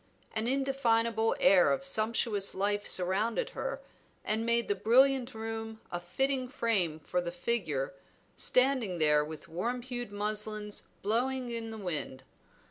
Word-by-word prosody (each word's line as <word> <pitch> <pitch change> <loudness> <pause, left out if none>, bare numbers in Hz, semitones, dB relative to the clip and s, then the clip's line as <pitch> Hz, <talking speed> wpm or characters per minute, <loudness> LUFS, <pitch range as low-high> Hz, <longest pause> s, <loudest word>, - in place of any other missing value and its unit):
An 220 +1 -1
indefinable 235 -4 +1
air 185 -2 +6
of 275 0 0
sumptuous 220 -5 +1
life 205 +1 0
surrounded 210 - 0
her, - - -4 0.4
and 220 +1 0
made 235 0 +2
the - - +2
brilliant 250 +5 +3
room 225 0 -5
a 175 - -2
fitting 255 +9 -1
frame 195 - 0
for 180 +4 -1
the 170 -1 -4
figure 175 - -1 0.4
standing 250 -8 +2
there 150 -2 +4
with 155 +1 -8
warm 235 +9 -3
hued 245 -3 -5
muslins 210 0 -3 0.2
blowing 245 +4 0
in 230 -1 -4
the 220 - -7
wind. 155 -9 -4
220 Hz, 135 wpm, -31 LUFS, 190-245 Hz, 0.4 s, air